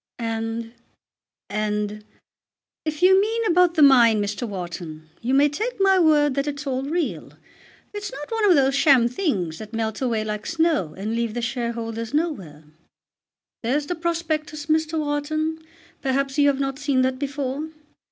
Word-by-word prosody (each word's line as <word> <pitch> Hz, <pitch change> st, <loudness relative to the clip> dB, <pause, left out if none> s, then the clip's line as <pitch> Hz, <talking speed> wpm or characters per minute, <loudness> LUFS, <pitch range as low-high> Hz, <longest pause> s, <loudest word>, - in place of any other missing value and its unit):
"And, 225 Hz, 0 st, -3 dB, 0.8 s
and 210 Hz, 0 st, -2 dB, 0.4 s
" -, -, -69 dB
"If 310 Hz, +2 st, -3 dB
you 380 Hz, +1 st, +7 dB
mean 450 Hz, +2 st, -1 dB
about 355 Hz, -2 st, +3 dB
the 310 Hz, -, +5 dB
mine, 240 Hz, -6 st, +6 dB
Mr. 205 Hz, +4 st, -2 dB
Wharton, 170 Hz, -4 st, -7 dB
you 255 Hz, +3 st, 0 dB
may 285 Hz, +2 st, +5 dB
take 430 Hz, -, -3 dB
my 385 Hz, -1 st, +4 dB
word 300 Hz, -4 st, +4 dB
that 275 Hz, +2 st, -1 dB
it's 290 Hz, 0 st, -4 dB
all 260 Hz, -1 st, -1 dB
real. 315 Hz, +4 st, -3 dB, 0.6 s
It's 415 Hz, -1 st, -5 dB
not 290 Hz, +7 st, -8 dB
one 445 Hz, -2 st, +2 dB
of 360 Hz, -, +6 dB
those 270 Hz, -1 st, +3 dB
sham 275 Hz, -4 st, +5 dB
things 210 Hz, -, -2 dB
that 215 Hz, +1 st, -9 dB
melt 220 Hz, 0 st, -2 dB
away 230 Hz, -4 st, 0 dB
like 210 Hz, 0 st, -4 dB
snow 320 Hz, -, 0 dB
and 210 Hz, +3 st, -3 dB
leave 230 Hz, -1 st, -2 dB
the 240 Hz, -, -2 dB
shareholders 230 Hz, 0 st, -3 dB
nowhere. 195 Hz, -, -2 dB, 1.0 s
There's 275 Hz, +6 st, 0 dB
the 355 Hz, -, -2 dB
prospectus, 320 Hz, -3 st, -2 dB
Mr. 315 Hz, +1 st, +1 dB
Wharton. 310 Hz, +2 st, -1 dB, 0.4 s
Perhaps 275 Hz, +1 st, -1 dB
you 285 Hz, -, +5 dB
have 280 Hz, -1 st, +2 dB
not 270 Hz, 0 st, -2 dB
seen 280 Hz, -3 st, +1 dB
that 255 Hz, 0 st, 0 dB
before. 285 Hz, +1 st, -3 dB
275 Hz, 160 wpm, -23 LUFS, 225-310 Hz, 1.0 s, you